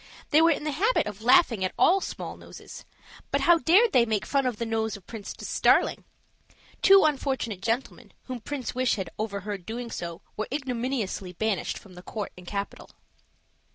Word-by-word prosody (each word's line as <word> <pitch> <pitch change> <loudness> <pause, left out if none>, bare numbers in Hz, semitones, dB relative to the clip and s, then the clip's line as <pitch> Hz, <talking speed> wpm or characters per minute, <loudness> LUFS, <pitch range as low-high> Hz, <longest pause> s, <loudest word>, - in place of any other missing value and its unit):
They 310 +1 +6
were 330 - +6
in 295 - 0
the 305 - -1
habit 420 - +2
of 210 0 -7
laughing 240 - +4
at 185 - -2
all 385 +2 +4
small - - -6
noses; - - -12 0.4
but - - 0
how 345 -1 +5
dared 400 +9 +5
they 245 - +5
make 220 -3 -1
fun 275 -2 +1
of 245 -4 -2
the 235 - -2
nose 220 -1 -1
of 190 - -19
Princess 220 -4 -6
Darling? - - +3 0.8
Two 390 0 +7
unfortunate 265 -9 -1
gentlemen, 230 +5 -3
whom 255 -2 -6
Prince 265 +3 -5
Wish 255 -1 +1
had 190 -5 -5
overheard 200 -2 -4
doing 235 +4 -6
so, 170 -1 -6
were 215 - -3
ignominiously 250 -8 -3
banished 215 +1 -1
from 195 - -14
the 180 - -11
court 210 +2 -5
and 180 -1 -14
capital. 200 +1 -5
230 Hz, 180 wpm, -27 LUFS, 200-275 Hz, 0.8 s, Two